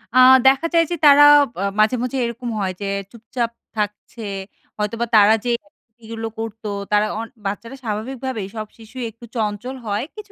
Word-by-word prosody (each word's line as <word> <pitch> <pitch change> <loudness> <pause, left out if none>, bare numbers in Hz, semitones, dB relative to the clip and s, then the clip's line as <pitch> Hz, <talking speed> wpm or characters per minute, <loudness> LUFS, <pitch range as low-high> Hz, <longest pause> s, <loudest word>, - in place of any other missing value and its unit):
আ - - +5 0.3
দেখা 270 +5 +4
যায় 335 0 +5
যে - - +1
তারা 290 0 +8 0.4
আ - - 0 0.2
মাঝে, 215 +4 +4
মাঝে 255 +2 -2
এরকম 235 +1 -5
হয় 190 -2 -1
যে - - -3 0.3
চুপচাপ 235 +1 -4 0.3
থাকছে, 210 +2 -4 0.6
হয়তো 210 +2 -2
বা - - +2
তারা 210 +1 +7
যেগুলো 225 0 -5
করতো, 225 -1 -5 0.2
তারা 210 0 +4
অন 230 - -4 0.2
বাচ্চারা 230 +6 -4
স্বাভাবিকভাবেই 230 0 -4
সব 215 -1 -5
শিশু 225 +3 -14
একটু 230 +2 -14
চঞ্চল 220 +4 -2
হয়, 205 +3 -1
কিছু, 415 -1 -10
225 Hz, 165 wpm, -21 LUFS, 210-250 Hz, 0.6 s, তারা